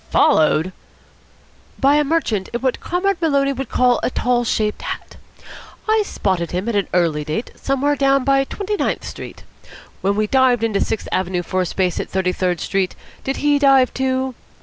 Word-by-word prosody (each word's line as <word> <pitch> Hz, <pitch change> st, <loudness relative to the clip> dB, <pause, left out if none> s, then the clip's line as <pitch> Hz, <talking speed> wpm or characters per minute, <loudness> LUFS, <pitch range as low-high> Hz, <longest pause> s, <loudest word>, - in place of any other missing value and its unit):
"Followed!" 160 Hz, +3 st, +3 dB, 1.1 s
"By 280 Hz, +2 st, +4 dB
a 300 Hz, -, +3 dB
merchant 275 Hz, -, 0 dB
in 240 Hz, -, -2 dB
what 260 Hz, -1 st, 0 dB
Comrade 360 Hz, +1 st, -1 dB
Maloney 280 Hz, -3 st, +2 dB
would 270 Hz, -2 st, -5 dB
call 250 Hz, -1 st, +3 dB
a -, -, 0 dB
tall 245 Hz, -1 st, +1 dB
shaped 215 Hz, -2 st, -1 dB
hat. -, -, -6 dB, 0.7 s
I 435 Hz, 0 st, +3 dB
spotted 185 Hz, -, -1 dB
him 185 Hz, +4 st, -3 dB
at 235 Hz, -, -1 dB
an 200 Hz, -, +1 dB
early 165 Hz, -4 st, +1 dB
date, 155 Hz, +10 st, -4 dB
somewhere 280 Hz, +2 st, 0 dB
down 275 Hz, -1 st, +2 dB
by 275 Hz, 0 st, +3 dB
Twenty 410 Hz, +7 st, -3 dB
ninth -, -, -1 dB
Street. -, -, -8 dB, 0.6 s
When 200 Hz, +1 st, +1 dB
we 215 Hz, +1 st, +1 dB
dived 250 Hz, 0 st, +3 dB
into 215 Hz, -3 st, +1 dB
Sixth 220 Hz, -, -2 dB
Avenue 180 Hz, -1 st, -1 dB
for 185 Hz, +2 st, -1 dB
a 180 Hz, -, -1 dB
space 180 Hz, 0 st, -1 dB
at -, -, -4 dB
Thirty 190 Hz, -1 st, 0 dB
third 180 Hz, -2 st, -1 dB
Street, 195 Hz, -2 st, -1 dB, 0.3 s
did 270 Hz, -, -2 dB
he 290 Hz, -1 st, +4 dB
dive, 270 Hz, -2 st, +4 dB
too? 260 Hz, 0 st, -1 dB
245 Hz, 180 wpm, -20 LUFS, 190-275 Hz, 1.1 s, By